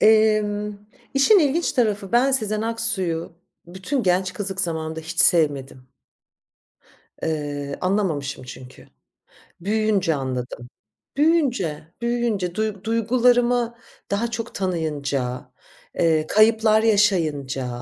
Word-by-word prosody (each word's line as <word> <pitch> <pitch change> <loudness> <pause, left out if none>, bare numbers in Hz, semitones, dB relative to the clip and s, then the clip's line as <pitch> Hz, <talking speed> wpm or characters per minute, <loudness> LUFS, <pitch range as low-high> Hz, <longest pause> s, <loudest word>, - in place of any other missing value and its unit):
Emm, 215 -1 +3 0.4
işin 275 +10 +6
ilginç 320 +1 +1
tarafı 210 -5 0
ben 250 +3 +4
Sezen 215 -4 0
Aksu'yu 225 -8 -2 0.3
bütün 190 +10 -3
genç 185 -1 +1
kızlık 195 -1 -4
zamanında 160 -2 -3
hiç 160 +1 -3
sevmedim. 140 -6 +2 1.3
Iıı, 145 -3 -3
anlamamışım 165 -9 -1
çünkü. 125 0 -12 0.7
Büyüyünce 205 -3 +1
anladım. 125 -3 -5 0.5
Büyüyünce, 265 - +1
büyüyünce 235 -7 -1
duyg 215 -2 -3
duygularımı 240 +1 +2 0.4
daha 220 +4 -1
çok 230 0 -5
tanıyınca, 145 -8 -3 0.5
ııı, 160 -2 +2
kayıplar 220 0 +4
yaşayınca, 160 - +1
200 Hz, 95 wpm, -22 LUFS, 160-225 Hz, 1.3 s, işin